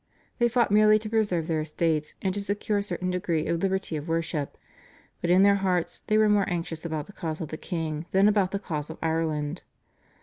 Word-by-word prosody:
They 240 0 +4
fought 235 -3 +2
merely 215 +1 +6
to 215 0 -6
preserve 205 -7 +1
their 160 -1 0
estates 155 0 -1
and 190 -1 +1
to 205 - -2
secure 205 +1 -1
a - - 0
certain 180 -2 -3
degree 170 -3 -1
of 170 0 -1
liberty 190 -3 -1
of 150 +2 -7
worship, 165 -3 -2 0.6
but 170 - -1
in 185 +2 +6
their 200 0 +5
hearts 185 -3 +1
they 215 - +3
were 215 0 +5
more 205 -2 +3
anxious 165 -2 -3
about 160 -3 -3
the 205 - -14
cause 160 -4 -4
of 160 -4 -5
the - - -5
king 160 -2 -4
than 195 +2 +4
about 205 -3 +3
the 200 - -2
cause 155 -7 -4
of 160 - -7
Ireland. 160 0 -1
175 Hz, 215 wpm, -27 LUFS, 160-200 Hz, 0.6 s, merely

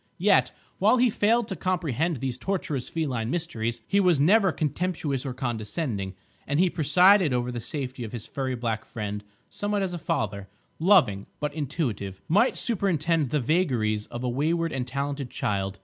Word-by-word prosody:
Yet, - - +4 0.3
while 255 - +5
he 245 -1 +4
failed 225 +2 +2
to 190 - -3
comprehend 165 - -1
these 130 0 -3
tortuous 175 -7 -2
feline 130 -9 -2
mysteries, 120 -8 -2
he 200 - +2
was 180 -6 +4
never 190 +6 +5
contemptuous 155 -4 -2
or 130 - -3
condescending; 110 - -3 0.3
and 145 +2 0
he 180 -1 +4
presided 180 +1 +5
over 125 0 0
the 120 -1 -4
safety 130 0 -5
of 110 - -6
his 120 -3 -6
furry 130 -2 -3
black 115 -2 -2
friend 105 -2 -5 0.2
somewhat 205 -1 -2
as 185 -2 -2
a 175 - -4
father, 100 -8 -2 0.3
loving, 160 - +4
but 150 -1 -2
intuitive, 125 - -3
might 210 +10 +3
superintend 165 - +1
the 150 - +1
vagaries 120 - +1
of 120 +1 -6
a - - 0
wayward 165 +6 0
and 130 -2 -3
talented 140 0 -3
child. 95 -3 -2
145 Hz, 165 wpm, -26 LUFS, 120-175 Hz, 0.3 s, while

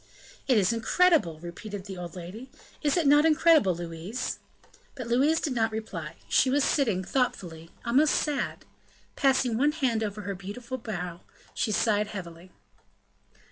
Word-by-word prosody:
"It 255 -4 +4
is 205 +2 +3
incredible!" 230 - +2
repeated 190 +3 -7
the 195 -2 -7
old 175 0 -7
lady: 190 +9 -8 0.3
"is 295 +2 +1
it 340 - +1
not 290 +1 +6
incredible, 315 - +4
Louise?" 175 +8 -5 0.6
But 255 -3 -6
Louise 275 +8 +3
did 290 - -2
not 225 -2 +1
reply; 175 -8 -6
she 265 - +3
was 280 +2 +2
sitting, 220 -13 +1
thoughtfully, 175 -9 -2 0.2
almost 275 +6 +3
sad; 295 -2 -2 0.5
passing 260 -4 +2
one 295 +2 +3
had 245 -7 0
over 210 -1 -3
her 200 0 -4
beautiful 210 +7 -7
brow, 180 -6 -5 0.3
she 215 - -1
sighed 210 0 +2
heavily. 180 -4 -8
220 Hz, 145 wpm, -27 LUFS, 185-270 Hz, 0.6 s, not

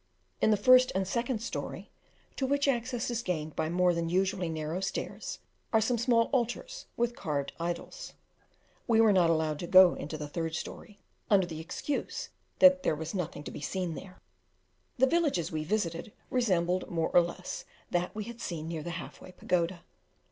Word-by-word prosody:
In - - +4
the 210 - +4
first 255 +2 +6
and 190 0 0
second 235 +2 -1
story, 245 - -5 0.4
to 265 - -1
which 285 +1 +1
access 245 -2 0
is 240 0 -1
gained 160 -7 -3
by 155 - -1
more 180 +1 +3
than 170 -1 -1
usually 185 0 0
narrow 160 +2 -3
stairs, 190 - -4 0.3
are 220 - +5
some 230 +2 +1
small 235 -1 +4
altars 270 - -2
with 240 0 0
carved 140 -3 -3
idols. 175 - -5 0.7
We 225 -2 +4
were 220 -2 +6
not 175 -3 +4
allowed 155 -2 +1
to 175 - -4
go 185 -1 +8
into 155 +2 -5
the 150 -1 -5
third 165 +2 -3
story, 205 +5 -7 0.3
under 195 -3 +5
the 160 -2 -7
excuse 180 - -4 0.3
that 275 0 +7
there - - +1
was 160 +1 -5
nothing 175 -5 -3
to - - -7
be - - -8
seen 180 0 -2
there. 185 +3 -10 0.8
The 260 - +5
villages 285 - +1
we 155 -1 -2
visited, 170 0 -2 0.2
resembled 185 -7 +1
more 165 -2 0
or 175 - +6
less, 175 +1 -5 0.3
that 175 +2 -1
we 215 - -3
had 235 +2 -9
seen 160 -3 -4
near 165 -1 -4
the 175 - -6
Half - - -9
way 185 - -12
Pagoda. 175 0 -1
185 Hz, 185 wpm, -30 LUFS, 165-235 Hz, 0.8 s, go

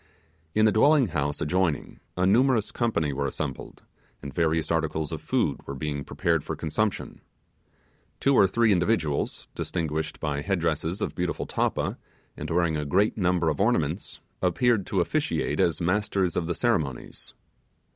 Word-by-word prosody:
In 110 0 +5
the 110 - +5
dwelling 140 +2 +4
house 75 -2 -2
adjoining 85 0 0 0.2
a 90 - +2
numerous 115 +2 +3
company 80 - 0
we 70 +1 -1
assembled, 65 -1 -5 0.4
and 70 -1 -6
various 80 0 +1
articles 80 -2 -1
of - - -5
food - - 0
were 70 - -4
being 70 +1 -3
prepared 80 0 0
for - - -4
consumption. 100 +7 -2 1.0
Two 140 - +3
or 100 -7 +6
three 115 +3 +3
individuals, 90 -6 0
distinguished 80 -2 -3
by 75 -2 -2
head 95 +4 0
dresses 80 +4 -1
of - - -2
beautiful 90 -1 -2
tappa, - - -1 0.4
and - - -6
wearing 85 -2 +1
a 75 - -2
great 95 +9 +2
number 90 -4 +1
of 75 +1 0
ornaments, 90 -6 0 0.2
appeared 100 +3 +2
to - - +1
officiate - - -1
as 85 -3 +2
masters 95 0 0
of 85 - -1
the 85 - -1
ceremonies. 80 - -2
85 Hz, 155 wpm, -26 LUFS, 75-105 Hz, 1.0 s, or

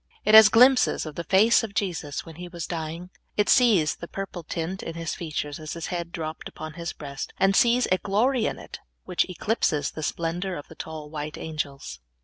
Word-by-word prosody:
It 215 - +3
has 220 -1 +11
glimpses 250 -1 +5
of 155 - -6
the 170 - -5
face 200 +7 +5
of 215 -2 -6
Jesus 165 -8 -2
when 160 -1 -11
He 180 0 -7
was 175 -2 -6
dying. 165 +2 -5 0.3
It 210 - +2
sees 220 - +4
the 170 - -8
purple 195 -2 -6
tint 170 +3 -4
in 165 - -6
His 165 -1 -3
features 150 -3 -4
as 155 -1 -6
His 165 -1 -5
head 170 -1 -4
dropped 160 -2 -5
upon 155 0 -8
His 170 +1 -5
breast, 140 -2 -7
and 195 0 +3
sees 240 +3 +4
a 185 - +3
glory 225 +4 +1
in - - -3
it - - -10 0.2
which - - 0
eclipses 180 -6 0
the 155 - -7
splendor 170 +4 -2
of 145 - -9
the - - -10
tall 155 -2 -8
white 150 -1 -5
angels. 140 - -5
170 Hz, 205 wpm, -25 LUFS, 155-195 Hz, 0.3 s, has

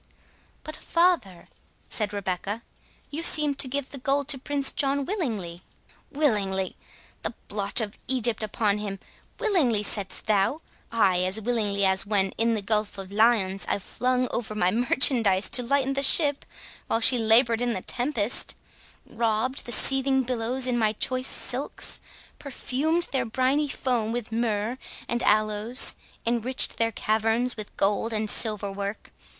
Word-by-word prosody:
"But, 310 - -7
father," 335 - 0 0.4
said 210 -2 -2
Rebecca, 200 +2 -4 0.5
"you 300 +3 -4
seemed 300 -4 +3
to 270 - +3
give 275 +1 -4
the 275 - -7
gold 275 +2 -1
to 275 -3 0
Prince 280 0 0
John 280 -1 0
willingly." 220 - -4 0.5
"Willingly? 200 -10 0 0.5
the - - -4
blotch 200 +2 +2
of 210 -2 -6
Egypt 240 -4 0
upon 210 -1 -1
him!—Willingly, 225 - -2
saidst 200 -2 +1
thou?—Ay, 215 - 0
as 185 +4 -1
willingly 210 -3 0
as 190 +1 +2
when, 195 -2 +1
in 230 +1 0
the 210 - -4
Gulf 210 0 -1
of 195 0 -9
Lyons, 205 -3 +2
I - - +1
flung 250 +5 -1
over 215 -2 -4
my 180 -3 +1
merchandise 230 -3 +3
to 250 - +3
lighten 275 +2 0
the 275 - -1
ship, 285 0 +4 0.4
while 225 - 0
she 245 +2 +7
laboured 230 +1 +3
in 245 -1 0
the 185 - -5
tempest—robed 235 0 -2
the - - -5
seething 265 +3 +4
billows 250 +1 -2
in 245 -2 0
my 215 -1 +1
choice 255 +4 0
silks—perfumed 280 +3 -3
their 260 -3 0
briny 260 +6 0
foam 245 -5 -2
with 235 -1 -5
myrrh 225 +1 -2 0.3
and 240 0 -2
aloes—enriched 225 +3 +1
their 230 0 +1
caverns 225 +3 -1
with 215 -3 -9
gold 205 +3 +1
and 215 -1 0
silver 210 -3 0
work! 200 +2 -6
230 Hz, 140 wpm, -25 LUFS, 210-260 Hz, 0.5 s, she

